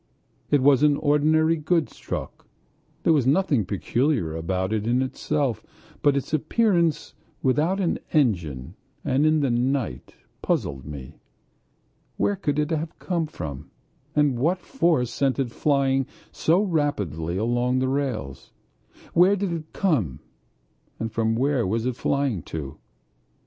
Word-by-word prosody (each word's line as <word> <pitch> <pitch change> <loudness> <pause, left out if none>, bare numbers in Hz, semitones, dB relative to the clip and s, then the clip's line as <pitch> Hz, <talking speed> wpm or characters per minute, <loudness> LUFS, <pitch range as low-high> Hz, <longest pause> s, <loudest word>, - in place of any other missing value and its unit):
It 145 -3 +3
was 140 -1 +5
an 150 -1 +4
ordinary 155 +3 +3
goods 160 +1 0
truck. - - -6 0.6
There 165 - +4
was 140 -5 +2
nothing 140 - +2
peculiar 110 - 0
about 95 +4 -2
it 110 0 -1
in 125 +2 +2
itself, 130 -3 -1 0.4
but 145 -2 +3
its 140 - -4
appearance 170 0 +1 0.3
without 155 +9 +2
an 180 -4 0
engine 85 - 0 0.3
and 140 +4 +2
in 155 -1 +3
the 135 -3 +1
night 120 - -1 0.3
puzzled 70 -1 -1
me. 70 -4 -9 1.0
Where 205 - +1
could 150 -7 -2
it 150 +2 0
have 160 0 -3
come 170 -4 -2
from 75 - -7 0.5
and 145 -5 +2
what 165 +8 +2
force 170 - +1
sent 135 +1 0
it 130 -4 -1
flying 135 -1 +1 0.2
so 175 +6 +2
rapidly 100 - -1
along 120 +4 +1
the 130 0 +1
rails? 130 - -3 0.6
Where 185 +4 +5
did 195 -2 -2
it 160 -2 -6
come 125 - 0 0.9
from 110 0 0
and 115 0 +1
where 130 -3 +1
was 110 +4 -1
it 125 -1 -1
flying 140 - 0
to? 70 -4 -6
135 Hz, 140 wpm, -24 LUFS, 110-155 Hz, 1.0 s, was